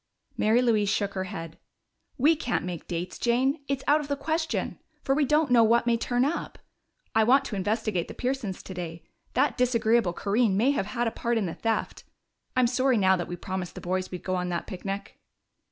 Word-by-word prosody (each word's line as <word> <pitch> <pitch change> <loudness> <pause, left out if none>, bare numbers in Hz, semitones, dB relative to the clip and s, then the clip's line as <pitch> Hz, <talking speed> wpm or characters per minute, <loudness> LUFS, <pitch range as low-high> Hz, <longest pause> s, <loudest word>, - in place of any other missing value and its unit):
Mary 225 +4 +3
Louise 215 -4 +2
shook 200 0 0
her 190 -1 -2
head. 165 -4 -7 0.6
"We 300 +6 +5
can't 250 - -2
make 175 -3 -6
dates, 175 +1 -4
Jane. 260 +5 +1
It's 275 -1 -2
out 295 +2 +4
of 290 - -7
the 285 - 0
question, 320 +3 -2 0.2
for 270 - +2
we 290 +1 +2
don't 300 0 +2
know 235 -2 +7
what 235 +2 +4
may 235 -1 +3
turn 245 +2 +1
up. 320 +4 -3 0.6
I 220 - +4
want 270 +5 +4
to 215 - -4
investigate 205 -2 -1
the - - -9
Pearsons 250 -7 -3
today. 170 -3 -6 0.3
That 270 +1 +2
disagreeable 230 -5 +2
Corinne 205 +1 +1
may 245 +7 +4
have 200 -9 -1
had 240 +1 -1
a - - 0
part 235 +1 -1
in 215 - 0
the 170 - -3
theft.... 225 -1 -2 0.5
I'm 255 -1 +4
sorry 255 +1 +2
now 190 -2 +4
that 175 -2 -3
we 175 - -4
promised 185 -1 -5
the - - -7
boys 185 +1 -2
we'd 180 - -7
go 185 - -1
on 180 0 -2
that 170 -1 -2
picnic." 195 0 -6
225 Hz, 205 wpm, -27 LUFS, 190-255 Hz, 0.6 s, know